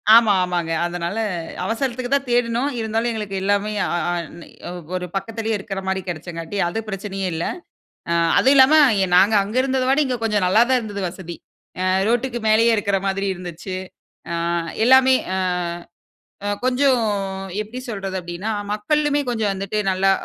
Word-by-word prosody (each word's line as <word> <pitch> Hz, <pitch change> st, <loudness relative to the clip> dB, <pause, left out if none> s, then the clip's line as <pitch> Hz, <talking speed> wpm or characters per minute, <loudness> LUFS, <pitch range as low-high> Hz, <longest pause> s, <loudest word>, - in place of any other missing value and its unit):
ஆமா. 225 Hz, -3 st, +6 dB
ஆமாங்க. 175 Hz, -2 st, -2 dB
அதனால 175 Hz, +3 st, -3 dB, 0.5 s
அவசரத்துக்கு 245 Hz, +2 st, -2 dB
தான் 280 Hz, -1 st, +1 dB
தேடினோம். 240 Hz, +2 st, +1 dB
இருந்தாலும், 225 Hz, +1 st, -1 dB
எங்களுக்கு 210 Hz, -3 st, -4 dB
எல்லாமே 205 Hz, +1 st, +1 dB
அ -, -, -2 dB, 0.2 s
அ -, -, 0 dB, 0.3 s
நி -, -, -12 dB, 0.5 s
ஒரு 180 Hz, -, -2 dB
பக்கத்திலே 225 Hz, +3 st, -3 dB
இருக்கிற 195 Hz, 0 st, -5 dB
மாரி 190 Hz, 0 st, 0 dB
கிடைச்சங்காட்டி 165 Hz, +2 st, -6 dB
அது 175 Hz, +6 st, -3 dB
பிரச்சனையே 195 Hz, -1 st, -4 dB
இல்ல. 160 Hz, -, -2 dB, 0.7 s
அ -, -, +3 dB, 0.2 s
அதுவும் 270 Hz, -, +5 dB
இல்லாம 265 Hz, +4 st, +7 dB, 0.4 s
நாங்க 200 Hz, +4 st, +5 dB
அங்கு 215 Hz, +6 st, -1 dB
இருந்தத 265 Hz, -1 st, 0 dB
விட 275 Hz, +3 st, +3 dB
இங்க 255 Hz, -2 st, -1 dB
கொஞ்சம் 210 Hz, -4 st, +1 dB
நல்லாதான் 240 Hz, +6 st, +4 dB
இருந்தது 205 Hz, -3 st, -5 dB
வசதி. 175 Hz, -2 st, -8 dB, 0.5 s
அ 185 Hz, -, 0 dB, 0.2 s
ரோட்க்கு 240 Hz, +1 st, 0 dB
மேலேயே 225 Hz, +2 st, +5 dB
இருக்கிற 200 Hz, -2 st, 0 dB
மாதிரி 195 Hz, +1 st, -1 dB
இருந்துச்சு. 175 Hz, +1 st, -6 dB, 0.6 s
ஆ -, -, -1 dB, 0.5 s
எல்லாமே 260 Hz, +1 st, +6 dB, 0.2 s
ஆ -, -, 0 dB, 1.3 s
கொஞ்சம் 255 Hz, -1 st, +3 dB, 0.6 s
எப்டி 220 Hz, +4 st, -9 dB
சொல்றது? 195 Hz, -4 st, -4 dB
அப்டினா 175 Hz, +5 st, -5 dB, 0.2 s
மக்களுமே 290 Hz, +7 st, +1 dB
கொஞ்சம் 220 Hz, -4 st, 0 dB
வந்துட்டு 195 Hz, +2 st, -3 dB
நல்லா 190 Hz, +1 st, +2 dB
210 Hz, 145 wpm, -21 LUFS, 190-245 Hz, 1.3 s, இல்லாம